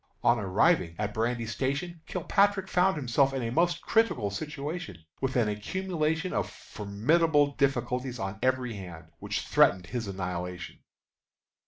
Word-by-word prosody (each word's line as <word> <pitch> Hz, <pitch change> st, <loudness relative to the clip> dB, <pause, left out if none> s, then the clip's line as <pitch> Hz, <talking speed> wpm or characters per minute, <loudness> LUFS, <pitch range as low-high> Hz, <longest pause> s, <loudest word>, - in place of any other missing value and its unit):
On 120 Hz, -1 st, +4 dB
arriving 100 Hz, -, +2 dB
at 105 Hz, 0 st, -2 dB
Brandy 115 Hz, +1 st, -1 dB
Station 140 Hz, -, -3 dB
Kilpatrick 195 Hz, +2 st, +1 dB
found 185 Hz, -1 st, +2 dB
himself 135 Hz, 0 st, +2 dB
in 130 Hz, -, -2 dB
a 115 Hz, -, -2 dB
most 170 Hz, +4 st, +1 dB
critical 130 Hz, -, +2 dB
situation, 145 Hz, -, -5 dB, 0.2 s
with 130 Hz, -1 st, -1 dB
an 120 Hz, -4 st, +3 dB
accumulation 160 Hz, -, -1 dB
of -, -, -1 dB
formidable 145 Hz, +9 st, +1 dB
difficulties 125 Hz, -2 st, -1 dB
on 95 Hz, -1 st, -4 dB
every 130 Hz, -2 st, +1 dB
hand, 85 Hz, -5 st, -9 dB
which -, -, -2 dB
threatened 90 Hz, -, +3 dB
his 115 Hz, +3 st, -4 dB
annihilation. 90 Hz, -2 st, -5 dB
125 Hz, 135 wpm, -29 LUFS, 105-160 Hz, 0.2 s, On